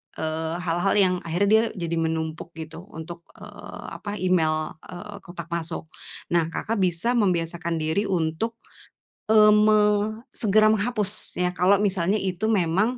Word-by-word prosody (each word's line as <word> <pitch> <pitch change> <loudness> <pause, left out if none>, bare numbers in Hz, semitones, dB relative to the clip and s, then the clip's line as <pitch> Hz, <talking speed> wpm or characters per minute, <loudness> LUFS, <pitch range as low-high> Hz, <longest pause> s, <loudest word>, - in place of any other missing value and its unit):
eee, 160 +1 -3
hal-hal 175 +3 +1
yang 185 -3 +4
akhirnya 180 +5 +1
dia 220 +1 +6 0.2
jadi 170 0 -1
menumpuk 160 0 -3
gitu 160 +3 -9
untuk, 170 +1 -8
eee, - - -10
apa, 205 0 -6
email, 160 -5 +1 0.2
eee, 200 +3 -9
kotak 175 -3 -10
masuk. 165 -1 -4 0.4
Nah, 170 -2 +2
Kakak 210 +6 -3
bisa 180 +5 +1
membiasakan 170 -6 0
diri 160 +6 0
untuk, 180 +5 -1 0.7
eee, 215 -1 +7
me 215 0 +5 0.5
segera 215 -1 +3
menghapus 215 -1 -1
ya. 180 0 0
Kalau 185 +2 +4
misalnya 195 0 +1
itu 195 +2 -2
memang, 200 +4 +1
180 Hz, 140 wpm, -24 LUFS, 165-210 Hz, 0.7 s, eee